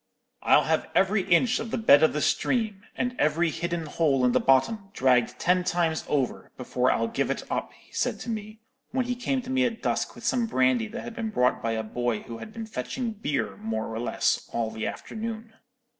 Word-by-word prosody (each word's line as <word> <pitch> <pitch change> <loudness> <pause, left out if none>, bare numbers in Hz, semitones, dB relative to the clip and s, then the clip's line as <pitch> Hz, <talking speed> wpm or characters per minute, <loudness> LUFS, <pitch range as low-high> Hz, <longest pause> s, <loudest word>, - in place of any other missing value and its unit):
"'I'll - - +5
have - - 0
every 195 +2 +3
inch 200 +8 +4
of 225 - -4
the - - -2
bed 150 -10 +6
of 160 - +5
the 150 - -2
stream, 220 -6 0
and 250 0 -2
every 160 +2 +2
hidden 170 0 -3
hole 145 -4 +2
in 125 - +4
the - - +3
bottom, 195 +10 +2
dragged 125 -2 +2
ten 180 +1 +2
times 170 -3 0
over, 135 -4 -1
before 125 0 0
I'll 115 - +1
give - - -1
it - - -2
up,' - - -2
he - - -23
said - - -1
to - - -6
me, 215 0 -6 0.3
when 255 -1 0
he 245 0 -1
came 255 +1 -1
to 250 - -6
me 260 0 +3
at 235 -2 -2
dusk - - -1
with - - -12
some 240 -3 +1
brandy 130 - +2
that - - -7
had 230 - -7
been 225 -3 -3
brought 125 -12 +1
by 115 0 -1
a 110 0 -2
boy 120 0 -2
who 115 -1 -8
had 215 - -9
been 225 +1 -6
fetching 225 - -4
beer, 145 - -2
more 110 +1 -3
or 110 - -3
less, 120 - 0
all 115 -1 -1
the 110 0 -3
afternoon. 225 0 -6
170 Hz, 220 wpm, -27 LUFS, -, 0.3 s, bed